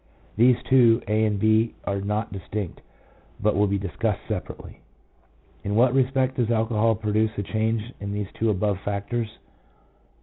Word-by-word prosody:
2 115 Hz, -, +4 dB
These -, -, -13 dB
two, 120 Hz, -3 st, +5 dB
(a) 110 Hz, +1 st, +2 dB
and 110 Hz, +2 st, +2 dB
(#), -, -, -32 dB
are 100 Hz, -1 st, -1 dB
not 105 Hz, +3 st, -2 dB
distinct, 95 Hz, 0 st, -5 dB, 0.6 s
but 105 Hz, 0 st, +1 dB
will 105 Hz, +1 st, +3 dB
be 100 Hz, 0 st, 0 dB
discussed 100 Hz, +2 st, -2 dB
separately. 105 Hz, -6 st, -6 dB, 0.8 s
In 100 Hz, +1 st, -2 dB
what 120 Hz, +2 st, +4 dB
respect 130 Hz, 0 st, +1 dB
does 120 Hz, -3 st, +1 dB
alcohol 115 Hz, -1 st, +2 dB
produce 110 Hz, 0 st, 0 dB
a 100 Hz, -, -1 dB
change 110 Hz, +3 st, -1 dB
in 100 Hz, 0 st, -5 dB
these 100 Hz, -1 st, -4 dB
two 115 Hz, -, 0 dB
above 100 Hz, -1 st, 0 dB
factors 105 Hz, +3 st, -3 dB
110 Hz, 160 wpm, -24 LUFS, 100-115 Hz, 0.8 s, two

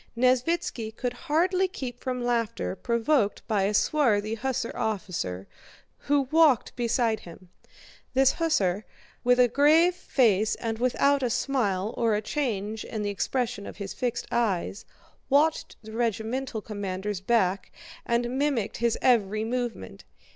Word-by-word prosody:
Nesvítski 255 Hz, -1 st, +1 dB
could 250 Hz, -1 st, -2 dB
hardly 340 Hz, +7 st, +1 dB
keep 250 Hz, -9 st, -7 dB
from 250 Hz, -2 st, -3 dB
laughter 230 Hz, -4 st, -1 dB
provoked 235 Hz, 0 st, 0 dB
by 205 Hz, -4 st, +1 dB
a 205 Hz, -, 0 dB
swarthy 220 Hz, -7 st, +2 dB
hussar 255 Hz, +1 st, -2 dB
officer 180 Hz, -, -3 dB, 0.5 s
who 290 Hz, 0 st, +2 dB
walked 310 Hz, -7 st, +4 dB
beside 235 Hz, -2 st, +1 dB
him. 175 Hz, +1 st, -13 dB, 0.7 s
This 270 Hz, 0 st, +5 dB
hussar, 210 Hz, -, 0 dB, 0.4 s
with 245 Hz, +1 st, +4 dB
a 250 Hz, -, +6 dB
grave 310 Hz, +8 st, +4 dB
face 220 Hz, -, +2 dB
and 225 Hz, -1 st, -4 dB
without 275 Hz, +3 st, +2 dB
a 250 Hz, -, 0 dB
smile 220 Hz, -6 st, 0 dB
or 230 Hz, -2 st, +1 dB
a 210 Hz, -, -1 dB
change 220 Hz, -6 st, -2 dB
in 215 Hz, -2 st, -4 dB
the 205 Hz, -, -1 dB
expression 220 Hz, 0 st, -2 dB
of -, -, -9 dB
his 200 Hz, -2 st, -5 dB
fixed 245 Hz, -2 st, -2 dB
eyes, 205 Hz, -3 st, -1 dB, 0.4 s
watched 300 Hz, +3 st, +2 dB
the 220 Hz, -, -10 dB
regimental 230 Hz, +1 st, -2 dB
commander's 200 Hz, -2 st, -4 dB
back 195 Hz, -3 st, +1 dB, 0.3 s
and 240 Hz, +2 st, -1 dB
mimicked 275 Hz, -8 st, 0 dB
his 235 Hz, -1 st, +1 dB
every 215 Hz, -4 st, +3 dB
movement. 240 Hz, +1 st, -4 dB
235 Hz, 135 wpm, -27 LUFS, 210-265 Hz, 0.7 s, a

